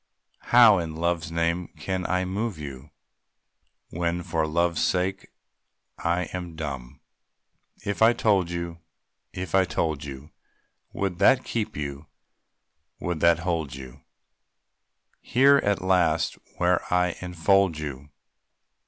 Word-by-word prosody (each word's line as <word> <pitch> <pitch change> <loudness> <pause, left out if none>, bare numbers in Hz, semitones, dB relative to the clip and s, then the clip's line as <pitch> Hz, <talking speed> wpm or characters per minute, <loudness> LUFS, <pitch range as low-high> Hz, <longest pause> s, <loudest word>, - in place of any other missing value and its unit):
How 115 -5 +7
in 80 -2 -4
Love's 85 -1 -1
name 85 +1 0
can 95 -1 -3
I 90 0 0
move 100 +1 -3
you? 70 -1 -8 1.0
When 85 +1 -2
for 80 -1 -1
Love's 85 +2 +1
sake 95 +2 0 0.7
I 85 +2 0
am 90 -2 -5
dumb! 70 -6 -6 0.8
If 100 +1 -3
I 110 +1 +7
told 100 -6 +2
you, 85 -1 -5 0.5
if 90 0 -6
I 95 0 +5
told 80 -3 -2
you, 70 +1 -9 0.6
Would 95 -3 -3
that 130 -1 +5
keep 110 -8 -3
you, 70 0 -5 0.9
would 85 -1 -3
that 85 0 +4
hold 80 -7 -2
you, 65 -2 -11 1.2
Here 140 +3 +5
at 100 -2 0
last 85 -4 +2 0.2
where 90 0 +2
I 90 -1 +2
enfold 90 0 +2
you? 75 -2 -6
85 Hz, 120 wpm, -25 LUFS, 80-95 Hz, 1.2 s, How